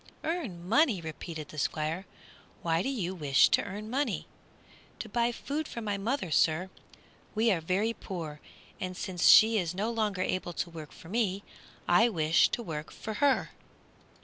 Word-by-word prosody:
"Earn 240 Hz, -, -3 dB
money!" 230 Hz, -, +4 dB
repeated 160 Hz, -1 st, -7 dB
the 155 Hz, -, -7 dB
Squire, 155 Hz, +6 st, -2 dB, 0.6 s
"why 165 Hz, 0 st, +2 dB
do 265 Hz, -, -1 dB
you 195 Hz, -9 st, -2 dB
wish 145 Hz, -7 st, +4 dB
to -, -, +4 dB
earn 205 Hz, +2 st, -6 dB
money?" 255 Hz, -1 st, -1 dB, 0.7 s
"To -, -, -6 dB
buy 240 Hz, -1 st, +1 dB
food 295 Hz, +5 st, -4 dB
for -, -, -6 dB
my 210 Hz, -3 st, -2 dB
mother, 220 Hz, -, -2 dB
sir. 165 Hz, +5 st, +2 dB, 0.6 s
We 225 Hz, +1 st, +3 dB
are 175 Hz, -4 st, +1 dB
very 195 Hz, +7 st, 0 dB
poor, 165 Hz, -9 st, -6 dB, 0.4 s
and 185 Hz, -1 st, -4 dB
since 180 Hz, -3 st, 0 dB
she 220 Hz, 0 st, +8 dB
is 175 Hz, -1 st, -2 dB
no 210 Hz, +5 st, -1 dB
longer 210 Hz, -5 st, 0 dB
able 185 Hz, -2 st, -2 dB
to 170 Hz, +2 st, -3 dB
work 155 Hz, -2 st, -9 dB
for 165 Hz, -, -14 dB
me 200 Hz, -2 st, 0 dB, 0.4 s
I 220 Hz, +7 st, +5 dB
wish 160 Hz, -5 st, +3 dB
to 235 Hz, -, -3 dB
work 155 Hz, -5 st, -5 dB
for 220 Hz, -, -6 dB
her." 285 Hz, -2 st, +3 dB
190 Hz, 170 wpm, -30 LUFS, 165-230 Hz, 0.7 s, she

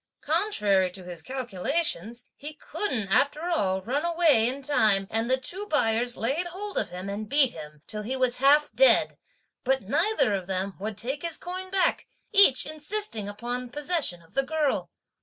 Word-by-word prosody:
Contrary 200 Hz, -, +2 dB
to 185 Hz, +1 st, -7 dB
his 175 Hz, -2 st, -8 dB
calculations, 245 Hz, -, -2 dB
he 295 Hz, +1 st, -7 dB
couldn't 255 Hz, -, -3 dB
after 290 Hz, -, +1 dB
all 190 Hz, -, 0 dB
run 275 Hz, -, -1 dB
away 330 Hz, -9 st, +3 dB
in 275 Hz, +2 st, -6 dB
time, 215 Hz, -8 st, +2 dB
and 225 Hz, +2 st, -1 dB
the 260 Hz, -, +4 dB
two 375 Hz, +10 st, -5 dB
buyers 240 Hz, -, +1 dB
laid 285 Hz, +10 st, 0 dB
hold 400 Hz, +4 st, -7 dB
of -, -, 0 dB
him 180 Hz, +2 st, -7 dB
and 205 Hz, +1 st, -5 dB
beat 280 Hz, -3 st, +4 dB
him, 150 Hz, -1 st, -11 dB
till 210 Hz, -, -5 dB
he 240 Hz, +5 st, -3 dB
was 255 Hz, -2 st, +1 dB
half 290 Hz, +3 st, +4 dB
dead; -, -, +4 dB, 0.5 s
but 265 Hz, -1 st, +1 dB
neither 330 Hz, -, +1 dB
of 190 Hz, -3 st, -3 dB
them 190 Hz, +1 st, -2 dB
would 210 Hz, +1 st, -5 dB
take 265 Hz, +7 st, -3 dB
his 335 Hz, -2 st, 0 dB
coin 370 Hz, +1 st, -7 dB
back, 375 Hz, -2 st, 0 dB, 0.2 s
each 395 Hz, -, +6 dB
insisting 305 Hz, -, -3 dB
upon 245 Hz, +4 st, -5 dB
the -, -, -19 dB
possession 290 Hz, -, -1 dB
of 165 Hz, -, -23 dB
the 275 Hz, -, +2 dB
girl. 300 Hz, 0 st, -1 dB
255 Hz, 175 wpm, -26 LUFS, 205-310 Hz, 0.5 s, each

